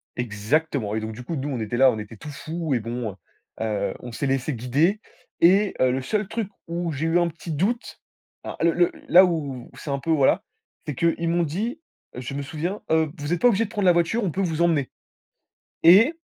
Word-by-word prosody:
Exactement 120 Hz, +1 st, -1 dB
et -, -, 0 dB
donc 110 Hz, 0 st, -5 dB
du 120 Hz, +3 st, -9 dB
coup 165 Hz, +5 st, -4 dB
nous, 140 Hz, +1 st, -3 dB
on 130 Hz, -4 st, -3 dB
était 110 Hz, +2 st, -3 dB
là, 130 Hz, -1 st, +6 dB
on 110 Hz, -, -4 dB
était 105 Hz, +1 st, -9 dB
tout 150 Hz, -, -9 dB
fous 155 Hz, +1 st, -4 dB
et 120 Hz, -, +2 dB
bon, 115 Hz, -1 st, -4 dB
heu, -, -, -14 dB, 0.5 s
heu, 105 Hz, -2 st, -1 dB
on 125 Hz, -, -8 dB
s'est 130 Hz, -, -3 dB
laissés 135 Hz, +2 st, 0 dB
guider, 145 Hz, -, +1 dB, 0.4 s
et 195 Hz, +4 st, +5 dB
heu, 130 Hz, -1 st, +4 dB
le 130 Hz, +1 st, -1 dB
seul 210 Hz, +8 st, -1 dB
truc 220 Hz, -3 st, -3 dB, 0.2 s
où 170 Hz, 0 st, -2 dB
j'ai 150 Hz, +3 st, -2 dB
eu 170 Hz, +2 st, +3 dB
un 175 Hz, -, +2 dB
petit 165 Hz, 0 st, -7 dB
doute, 205 Hz, -, -2 dB, 0.4 s
à -, -, -6 dB
le 170 Hz, -, +5 dB
le 175 Hz, 0 st, +3 dB, 0.2 s
là 185 Hz, +2 st, +8 dB
où 140 Hz, -8 st, -3 dB
c'est 145 Hz, -, -6 dB
un 140 Hz, -, -1 dB
peu, 165 Hz, -, -7 dB
voilà, 140 Hz, -4 st, +3 dB, 0.4 s
c'est 145 Hz, -, -3 dB
qu'ils 170 Hz, +3 st, +1 dB
m'ont 170 Hz, 0 st, +2 dB
dit, 220 Hz, -, -3 dB, 0.4 s
je 125 Hz, +2 st, -6 dB
me 140 Hz, -, -3 dB
souviens, 165 Hz, +7 st, -4 dB
heu: 160 Hz, -2 st, +2 dB
«Vous 145 Hz, +2 st, -4 dB
êtes 170 Hz, -, -2 dB
pas 245 Hz, -, +6 dB
obligés 225 Hz, +1 st, +2 dB
de -, -, -10 dB
prendre 205 Hz, -4 st, -1 dB
la 180 Hz, -, +7 dB
voiture, 175 Hz, +7 st, +1 dB
on 180 Hz, -, 0 dB
peut 195 Hz, -, -2 dB
vous 170 Hz, -3 st, -1 dB
emmener» 150 Hz, -6 st, +2 dB, 0.9 s
et 205 Hz, -, +7 dB
155 Hz, 230 wpm, -24 LUFS, 125-175 Hz, 0.9 s, là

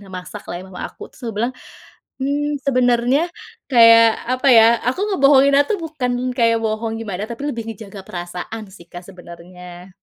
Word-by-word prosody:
Nah, 200 Hz, -, -15 dB
masaklah 185 Hz, +1 st, -8 dB
ya -, -, -11 dB
mama 180 Hz, -1 st, -9 dB
aku -, -, -12 dB
terus -, -, -20 dB
aku 225 Hz, -, -6 dB
bilang, 240 Hz, +3 st, -1 dB, 0.7 s
mmm, 290 Hz, +1 st, -1 dB
sebenarnya 250 Hz, +1 st, +2 dB, 0.5 s
kayak 230 Hz, -1 st, +7 dB, 0.3 s
apa 255 Hz, +2 st, -1 dB
ya 225 Hz, -1 st, +8 dB, 0.2 s
aku 255 Hz, +9 st, -1 dB
ngebohonginnya 280 Hz, -1 st, +5 dB
tuh 420 Hz, -, 0 dB
bukan 290 Hz, -6 st, -3 dB, 0.3 s
kayak 230 Hz, -1 st, +3 dB
bohong 220 Hz, +1 st, -2 dB
gimana 200 Hz, -3 st, -5 dB
tapi 235 Hz, +4 st, -7 dB
lebih 235 Hz, -4 st, -5 dB
ngejaga 205 Hz, -2 st, -10 dB
perasaan 180 Hz, +5 st, -7 dB
sih 170 Hz, -2 st, -15 dB
Kak 175 Hz, 0 st, -9 dB
sebenarnya. 180 Hz, 0 st, -12 dB
230 Hz, 160 wpm, -19 LUFS, 185-260 Hz, 0.7 s, ya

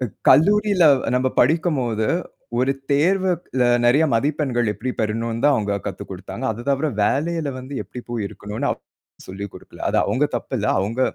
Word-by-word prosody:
க 125 Hz, -, 0 dB, 0.2 s
கல்லூரியில 200 Hz, +2 st, +5 dB, 0.3 s
நம்ம 130 Hz, +1 st, +2 dB
படிக்கும்போது 130 Hz, -7 st, +1 dB, 0.5 s
ஒரு 130 Hz, +2 st, +2 dB, 0.2 s
தேர்வுல 185 Hz, +6 st, +3 dB, 0.4 s
அ -, -, +3 dB, 0.2 s
நிறைய 140 Hz, +7 st, +5 dB
மதிப்பெண்கள் 135 Hz, -2 st, 0 dB
எப்பிடி 120 Hz, +5 st, -4 dB
பெறணுன்னு 115 Hz, +2 st, -2 dB
தான் 145 Hz, -1 st, +5 dB
அவுங்க 100 Hz, -2 st, -1 dB
கத்து -, -, -5 dB
கொடுத்தாங்க. -, -, -7 dB
அது 115 Hz, -, -8 dB
தவிர 140 Hz, +3 st, +1 dB, 0.2 s
வேலையில 160 Hz, +3 st, 0 dB
வந்து 130 Hz, +2 st, -9 dB
எப்பிடி 125 Hz, -, -9 dB
போய் 115 Hz, -4 st, -2 dB
இருக்கணுன்னு 110 Hz, +7 st, -4 dB
அப் -, -, -4 dB, 0.5 s
சொல்லிக் 100 Hz, +1 st, -6 dB
கொடுக்கல. -, -, -14 dB
அது -, -, 0 dB
அவுங்க 145 Hz, +4 st, +1 dB
தப்பு -, -, -6 dB
இல்ல. 105 Hz, -, -1 dB
அவுங்க 110 Hz, +6 st, -2 dB
130 Hz, 160 wpm, -22 LUFS, 115-150 Hz, 0.5 s, கல்லூரியில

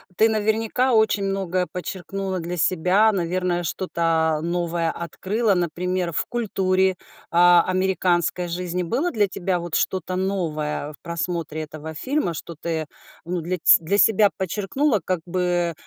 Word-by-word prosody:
ты 220 Hz, +4 st, +4 dB
наверняка 220 Hz, +4 st, +1 dB
очень 220 Hz, -2 st, +3 dB
многое 185 Hz, -2 st, -1 dB
подчеркнула 190 Hz, +1 st, -4 dB
для 175 Hz, +1 st, -4 dB
себя, 185 Hz, +6 st, +3 dB
наверное, 180 Hz, -1 st, -1 dB
что-то 165 Hz, -2 st, 0 dB
новое 170 Hz, 0 st, -1 dB
открыла. 195 Hz, +6 st, -1 dB
Например, 180 Hz, +1 st, -1 dB
в -, -, 0 dB
культуре, 190 Hz, -5 st, +1 dB, 0.3 s
а, 175 Hz, 0 st, +6 dB
американской 185 Hz, -2 st, +1 dB
жизни 180 Hz, +1 st, -3 dB
было 265 Hz, -, -1 dB
для 210 Hz, -3 st, +2 dB
тебя 185 Hz, -1 st, -2 dB
вот 170 Hz, -2 st, -4 dB
что-то 185 Hz, -1 st, -1 dB
новое 155 Hz, -6 st, -2 dB
в -, -, -17 dB
просмотре 170 Hz, -2 st, -3 dB
этого 155 Hz, +1 st, -8 dB
фильма, 255 Hz, -, -1 dB
что 170 Hz, +1 st, -7 dB
ты, 160 Hz, 0 st, -3 dB, 0.4 s
ну, 175 Hz, +1 st, -2 dB
для 180 Hz, +3 st, -2 dB
ц -, -, +6 dB
для 195 Hz, +5 st, +1 dB
себя 210 Hz, -1 st, +5 dB
подчеркнула, 210 Hz, -, 0 dB
как 185 Hz, 0 st, -1 dB
бы, 175 Hz, -1 st, 0 dB
180 Hz, 140 wpm, -23 LUFS, 170-195 Hz, 0.4 s, а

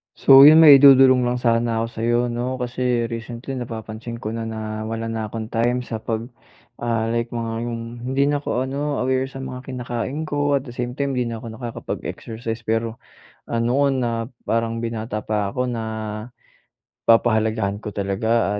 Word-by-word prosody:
So 135 Hz, +1 st, +8 dB
'yon, 160 Hz, +2 st, +8 dB
may 145 Hz, -3 st, +10 dB
idudulong 130 Hz, -2 st, +7 dB
lang 120 Hz, -, 0 dB
sana 115 Hz, -1 st, +1 dB
ako -, -, -2 dB
sa'yo 120 Hz, +1 st, +2 dB
'no, 120 Hz, +2 st, -2 dB
kasi 125 Hz, -1 st, -1 dB
recently 120 Hz, +3 st, -6 dB
napapansin 115 Hz, -1 st, -6 dB
ko 110 Hz, -, -4 dB
na 115 Hz, 0 st, -4 dB
na 110 Hz, -1 st, -5 dB
wala 115 Hz, 0 st, -3 dB
na 110 Hz, -1 st, -3 dB
akong 110 Hz, +1 st, -6 dB
time 120 Hz, +2 st, +1 dB
sa 115 Hz, -2 st, -5 dB
pag, 110 Hz, 0 st, -3 dB, 0.6 s
ah, 115 Hz, -1 st, -1 dB
like 115 Hz, 0 st, -1 dB
mga 115 Hz, -1 st, -3 dB, 0.2 s
yung 115 Hz, -1 st, -4 dB, 0.3 s
hindi 135 Hz, +1 st, +2 dB
na 145 Hz, 0 st, +1 dB
ako 130 Hz, -3 st, -2 dB
ano 140 Hz, +2 st, -2 dB
aware 130 Hz, +1 st, 0 dB
sa 135 Hz, 0 st, -8 dB
mga 130 Hz, -1 st, -6 dB
kinakain 125 Hz, +3 st, -4 dB
ko 145 Hz, -2 st, 0 dB
at 135 Hz, -, -1 dB
the 130 Hz, -, -9 dB
same 125 Hz, 0 st, -4 dB
time 140 Hz, 0 st, -1 dB
'di 125 Hz, -2 st, -1 dB
na 115 Hz, -1 st, -5 dB
ako 115 Hz, -, -6 dB
nakakapag-exercise, 115 Hz, -1 st, -6 dB
pero, 115 Hz, +1 st, -1 dB, 0.5 s
ano 120 Hz, +5 st, +1 dB
na 120 Hz, -4 st, -1 dB, 0.2 s
parang 115 Hz, 0 st, -1 dB
binata 110 Hz, -2 st, -4 dB
pa 105 Hz, -2 st, -1 dB
ako 125 Hz, -, 0 dB
na, 115 Hz, -2 st, -3 dB, 1.3 s
papahalagahan 110 Hz, -3 st, +2 dB
ko 110 Hz, -, -5 dB
talaga 100 Hz, +2 st, 0 dB
115 Hz, 170 wpm, -22 LUFS, 115-130 Hz, 1.3 s, may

